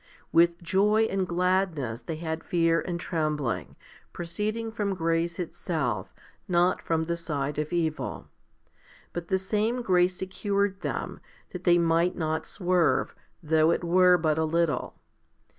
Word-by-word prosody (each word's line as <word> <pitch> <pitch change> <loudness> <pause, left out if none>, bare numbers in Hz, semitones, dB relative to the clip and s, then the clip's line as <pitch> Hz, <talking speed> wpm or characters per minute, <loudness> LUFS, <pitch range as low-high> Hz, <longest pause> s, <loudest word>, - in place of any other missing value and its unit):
With 170 +1 +3
joy 210 +5 +3
and 190 -1 0
gladness 175 -9 0
they 165 - -5
had 160 0 -4
fear 165 -1 +2
and 175 -1 -4
trembling, 150 - -2 0.4
proceeding 210 +7 -3
from 205 -3 -2
grace 165 0 0
itself, 155 - -3 0.4
not 175 +1 +2
from 160 -1 0
the 170 +1 -1
side 145 -4 -3
of 150 0 -3
evil; 160 -3 -2 0.9
but 175 -1 -5
the 190 - +2
same 215 +6 -1
grace 180 -3 +3
secured 200 +1 -1
them, - - -4 0.3
that 180 0 -8
they 175 -1 +6
might 170 +1 +2
not 160 -1 -2
swerve, 180 -3 +1 0.3
though 155 0 +3
it 170 - +1
were 180 +1 +5
but 160 -2 +1
a - - +2
little. 160 -4 0
170 Hz, 140 wpm, -27 LUFS, 160-185 Hz, 0.9 s, they